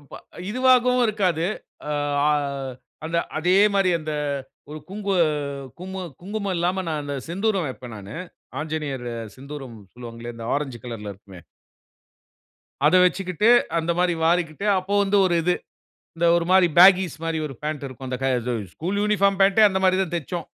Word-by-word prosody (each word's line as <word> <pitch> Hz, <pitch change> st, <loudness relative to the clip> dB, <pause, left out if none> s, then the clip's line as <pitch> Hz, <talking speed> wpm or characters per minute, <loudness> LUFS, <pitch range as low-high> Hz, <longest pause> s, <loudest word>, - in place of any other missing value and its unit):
இப்ப 145 Hz, -, -12 dB, 0.3 s
இதுவாகவும் 250 Hz, 0 st, +4 dB
இருக்காது. 180 Hz, -6 st, 0 dB, 0.4 s
அ -, -, 0 dB, 0.4 s
அ -, -, +4 dB, 0.7 s
அந்த 170 Hz, +1 st, 0 dB, 0.2 s
அதே 180 Hz, +4 st, +3 dB, 0.2 s
மாரி 195 Hz, -2 st, +3 dB
அந்த 155 Hz, 0 st, -4 dB, 0.6 s
ஒரு 155 Hz, -, -6 dB
குங்கு 200 Hz, -1 st, -2 dB, 0.6 s
கும்ம 190 Hz, +1 st, -6 dB, 0.2 s
குங்குமம் 200 Hz, +1 st, -3 dB
இல்லாம 180 Hz, +3 st, 0 dB
நான் 155 Hz, -2 st, -2 dB
அந்த 145 Hz, 0 st, -4 dB
செந்தூரம் 195 Hz, -1 st, 0 dB
வப்பேன் 125 Hz, -2 st, -8 dB
நானு. 100 Hz, +2 st, -9 dB, 0.4 s
ஆஞ்சநேயர் 150 Hz, -5 st, -4 dB, 0.3 s
செந்தூரம் 135 Hz, -3 st, -9 dB, 0.2 s
சொல்லுவாங்களே! 120 Hz, -1 st, -8 dB
இந்த 115 Hz, -, -7 dB
ஆரஞ்சு 135 Hz, -4 st, -3 dB
கலர்‌ல 110 Hz, -4 st, -6 dB
இருக்குமே 95 Hz, -2 st, -14 dB, 1.4 s
அத 155 Hz, +4 st, +5 dB
வச்சிக்கிட்டு, 185 Hz, +3 st, +1 dB, 0.3 s
அந்த 165 Hz, +1 st, 0 dB
மாதிரி 180 Hz, -1 st, +2 dB
வாரிக்கிட்டு 170 Hz, +2 st, 0 dB
அப்போ 190 Hz, +2 st, -5 dB
வந்து 200 Hz, +1 st, +2 dB
ஒரு 175 Hz, -2 st, +2 dB
இது. 180 Hz, +2 st, +2 dB, 0.6 s
இந்த 170 Hz, +1 st, +2 dB
ஒரு 170 Hz, -, 0 dB
மாரி 185 Hz, -1 st, +6 dB
பேகீஸ் 185 Hz, -2 st, +7 dB
மாரி 165 Hz, -1 st, -1 dB
ஒரு 135 Hz, -, -8 dB
பேன்ட் 150 Hz, -2 st, -3 dB
இருக்கும். 130 Hz, 0 st, -8 dB
அந்த 125 Hz, -, -2 dB
க -, -, +1 dB, 0.2 s
ஸு 125 Hz, -, 0 dB, 0.2 s
ஸ்கூல் 185 Hz, +5 st, -2 dB
யூனிஃபார்ம் 200 Hz, -2 st, +2 dB
பேன்ட்‌டே 195 Hz, +3 st, +5 dB
அந்த 190 Hz, -, -1 dB
மாதிரி 185 Hz, 0 st, +4 dB
தான் 175 Hz, -, -5 dB
தைச்சோம். 170 Hz, +1 st, -4 dB
170 Hz, 155 wpm, -23 LUFS, 140-195 Hz, 1.4 s, பேகீஸ்